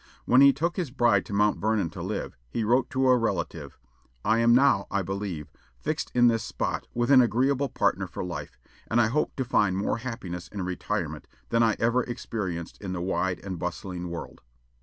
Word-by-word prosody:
When 125 +2 +5
he 140 0 +9
took 165 +6 -2
his 175 -7 -1
bride 120 -6 +2
to - - -6
Mount 105 +1 +2
Vernon 105 -5 0
to - - -8
live, - - -4
he 115 - -2
wrote 120 +5 +2
to 130 -2 +1
a 130 - +6
relative, 115 -2 -2 0.5
"I 110 +2 +3
am 115 0 +5
now, 130 -6 +4
I 100 -1 0
believe, 95 -6 -4 0.3
fixed - - -3
in 120 0 +5
this 115 -2 +4
spot - - -3
with 120 +3 +1
an 130 -2 +8
agreeable 130 +4 +1
partner - - 0
for - - -6
life; 90 -1 -6 0.3
and 115 - +2
I 115 -2 +4
hope 150 +6 0
to 130 - -2
find 100 -6 +2
more 100 - 0
happiness 95 -8 -6
in 100 -3 -5
retirement 90 -2 -3 0.2
than 115 0 +2
I 110 -2 +3
ever 120 +2 +2
experienced 100 -8 -5
in 95 -2 -4
the 90 - -3
wide 90 -1 -1
and 95 -3 -6
bustling 90 0 -4
world." 85 0 -7
110 Hz, 200 wpm, -27 LUFS, 95-125 Hz, 0.5 s, he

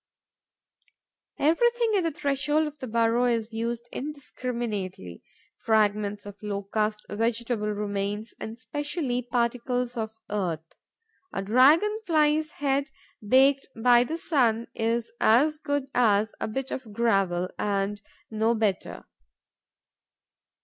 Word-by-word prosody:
Everything 465 - +2
at 390 - +3
the 330 - +1
threshold 290 +2 0
of 300 -1 -7
the 260 - -5
burrow 230 +1 +2
is 230 -2 0
used 235 +1 -3
indiscriminately: 235 - -5 0.4
fragments 210 -2 +1
of 205 0 -10
Locust, 210 +1 -2
vegetable 230 0 -1
remains 205 +1 -3
and 220 - -5
especially 275 +1 -3
particles 245 +1 -1
of 220 -1 -4
earth. 175 -6 -2 0.7
A 195 - -3
Dragon 295 - +5
fly's 310 -1 +2
head 280 0 0 0.3
baked 265 +5 +4
by 240 +1 +6
the 320 +6 -4
sun 240 -9 +1
is 230 +1 -1
as 295 +7 +4
good 285 -2 -1
as 215 -3 +3
a - - -2
bit 265 +4 -4
of 250 -5 -5
gravel 195 -5 +1
and 205 0 -1 0.3
no 220 +2 +1
better. 215 -4 -2
235 Hz, 115 wpm, -27 LUFS, 210-275 Hz, 0.7 s, by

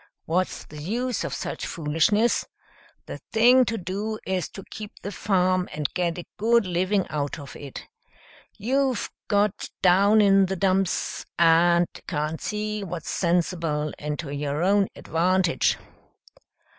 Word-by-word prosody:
What's 180 +3 -1
the 150 0 -10
use 240 +8 -2
of - - -3
such - - -4
foolishness? 165 +9 +1 0.6
The - - -7
thing 245 +3 +6
to 230 0 -2
do 205 +4 -3
is 185 -3 -1
to 195 - -10
keep 210 -1 -7
the 200 - -4
farm 185 -3 +1
and 150 -2 -3
get 175 -2 -1
a 175 - -6
good 230 +1 +3
living 185 +2 +1
out 145 -2 -2
of 140 -3 -10
it. 140 -2 -9 0.7
You've 260 +2 0 0.2
got 205 -1 +1
down 200 +4 +5
in 195 -2 +5
the 190 - -2
dumps 190 0 0
and 170 +1 +5 0.2
can't 155 0 -2
see 210 0 -3
what's 175 -4 -5
sensible 165 -4 0
and 150 0 -3
to 145 -5 -5
your 145 +2 -2
own 200 +1 +3
advantage." 180 +1 +1
185 Hz, 140 wpm, -25 LUFS, 165-205 Hz, 0.7 s, thing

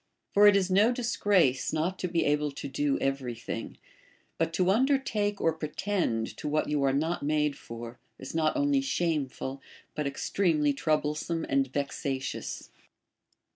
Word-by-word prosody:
For 205 +1 +7
it 205 - +7
is 190 -1 +2
no 205 +5 +5
disgrace 205 - +2
not 165 +4 -1
to 180 - -1
be 170 -1 0
able 150 0 +1
to 140 - -6
do 140 +1 0
every 135 -3 -2
thing; 115 0 -6 0.6
but 165 0 +1
to 185 +1 +2
undertake 220 -4 +1
or 165 - +2
pretend 155 - -2
to - - -5
what 150 +1 +1
you 150 -1 0
are 135 - +3
not 160 +5 0
made 150 0 +1
for 115 -1 -9 0.2
is 130 - -8
not 160 -1 +1
only 285 -1 +2
shameful, 145 - -2 0.3
but 150 -2 -2
ex 140 - -4
ti'emely 155 -7 +2
troublesome 155 +2 -1
and 135 -1 +1
vexatious. 140 -1 -3
155 Hz, 155 wpm, -29 LUFS, 140-190 Hz, 0.6 s, For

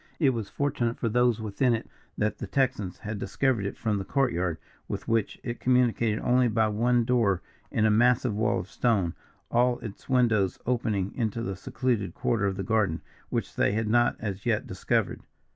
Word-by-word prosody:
It 140 -5 +4
was 115 -5 -4
fortunate 120 -5 -1
for 115 - -1
those 120 0 +2
within 110 +3 +1
it 115 - -6 0.3
that 105 0 -1
the - - -5
Texans 125 -9 0
had 105 0 -5
discovered 125 -6 0
it - - -6
from 105 -3 0
the - - -3
court 135 +5 +1
yard, 85 -1 -1 0.3
with - - -5
which 115 -2 0
it 120 -1 -4
communicated 120 -3 +2
only 125 0 +3
by 110 -1 +2
one 120 +3 +2
door 115 -7 +2 0.3
in 110 - +1
a 110 - +4
massive 120 +1 +3
wall 110 - +1
of - - -10
stone 100 -6 +1 0.4
all 120 +1 +3
its 110 +2 -9
windows 115 -7 +2
opening 110 -6 0
into 115 -1 -2
the 95 -4 -3
secluded 110 +1 -2
quarter 110 -4 +1
of 95 -1 -2
the 95 - -2
garden, 105 -7 +1 0.3
which - - -3
they - - +2
had 110 +1 0
not 120 +2 +3
as 100 -3 -4
yet 115 +2 0
discovered. 95 -6 -1
115 Hz, 190 wpm, -27 LUFS, 100-125 Hz, 0.4 s, It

